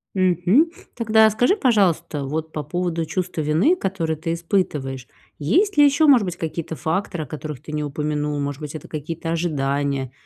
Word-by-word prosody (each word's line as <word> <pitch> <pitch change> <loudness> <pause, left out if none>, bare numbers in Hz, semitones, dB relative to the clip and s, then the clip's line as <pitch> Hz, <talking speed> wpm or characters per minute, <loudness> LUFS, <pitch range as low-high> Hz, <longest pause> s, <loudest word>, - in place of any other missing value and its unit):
Мгм. 185 - +3 0.2
Тогда 220 -1 +4
скажи, 245 - +2
пожалуйста, 180 - +1
вот 160 +3 -4
по 150 - -3
поводу 170 +1 -2
чувства 180 -1 -3
вины, 160 - +3
которое 185 - -2
ты 165 +2 -4
испытываешь, 150 -7 -2 0.3
есть 365 - +2
ли 290 - +8
ещё, 285 +2 +4
может 260 -6 +6
быть, 180 -2 -4
какие-то 160 -1 -4
факторы, 165 +2 -2
о - - -16
которых 150 -2 -7
ты 155 0 -9
не 150 0 -1
упомянул? 150 0 -2
Может 140 +1 -3
быть, 150 0 -6
это 155 - -8
какие-то 165 +2 -5
ожидания, 140 -5 -1
165 Hz, 170 wpm, -22 LUFS, 150-190 Hz, 0.3 s, ли